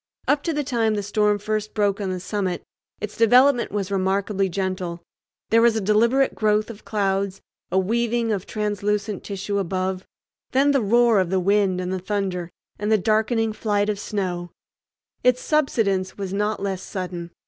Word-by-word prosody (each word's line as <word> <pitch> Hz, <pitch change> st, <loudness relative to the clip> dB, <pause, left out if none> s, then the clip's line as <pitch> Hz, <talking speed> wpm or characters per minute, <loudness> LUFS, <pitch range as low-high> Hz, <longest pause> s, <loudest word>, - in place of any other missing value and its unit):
Up 290 Hz, -1 st, +3 dB
to 335 Hz, -, +1 dB
the 295 Hz, -1 st, -1 dB
time 230 Hz, -5 st, +1 dB
the 205 Hz, -, -2 dB
storm 210 Hz, +1 st, +2 dB
first 215 Hz, +1 st, -3 dB
broke 205 Hz, -1 st, +1 dB
on 195 Hz, -, -2 dB
the 185 Hz, -1 st, -3 dB
summit 185 Hz, -1 st, -2 dB, 0.4 s
its 210 Hz, 0 st, -5 dB
development 245 Hz, +3 st, +4 dB
was 200 Hz, -1 st, -2 dB
remarkably 195 Hz, +1 st, 0 dB
gentle. 185 Hz, -2 st, -3 dB, 0.5 s
There 230 Hz, +1 st, +5 dB
was 235 Hz, -1 st, +4 dB
a -, -, +1 dB
deliberate 230 Hz, +6 st, +3 dB
growth 215 Hz, +1 st, +1 dB
of 210 Hz, -, -13 dB
clouds, 195 Hz, -2 st, -1 dB, 0.3 s
a 185 Hz, -, +1 dB
weaving 230 Hz, +3 st, +1 dB
of 200 Hz, -3 st, -2 dB
translucent 210 Hz, -1 st, -2 dB
tissue 200 Hz, 0 st, -3 dB
above, 185 Hz, 0 st, -2 dB, 0.5 s
then 275 Hz, +2 st, +4 dB
the 275 Hz, -2 st, +2 dB
roar 230 Hz, 0 st, +4 dB
of 185 Hz, -2 st, +1 dB
the 190 Hz, 0 st, +1 dB
wind 195 Hz, 0 st, +2 dB
and 180 Hz, 0 st, -2 dB
the 190 Hz, -, -2 dB
thunder, 185 Hz, -3 st, -2 dB, 0.3 s
and 210 Hz, +1 st, -1 dB
the 220 Hz, -, +6 dB
darkening 220 Hz, +2 st, +1 dB
flight 205 Hz, -1 st, 0 dB
of 205 Hz, -1 st, -1 dB
snow. 180 Hz, -4 st, -3 dB, 0.7 s
Its 250 Hz, 0 st, +4 dB
subsidence 215 Hz, -12 st, 0 dB
was 195 Hz, -2 st, -4 dB
not 210 Hz, 0 st, -1 dB
less 190 Hz, -2 st, -2 dB
sudden. 180 Hz, -3 st, -5 dB
205 Hz, 170 wpm, -23 LUFS, 190-220 Hz, 0.7 s, the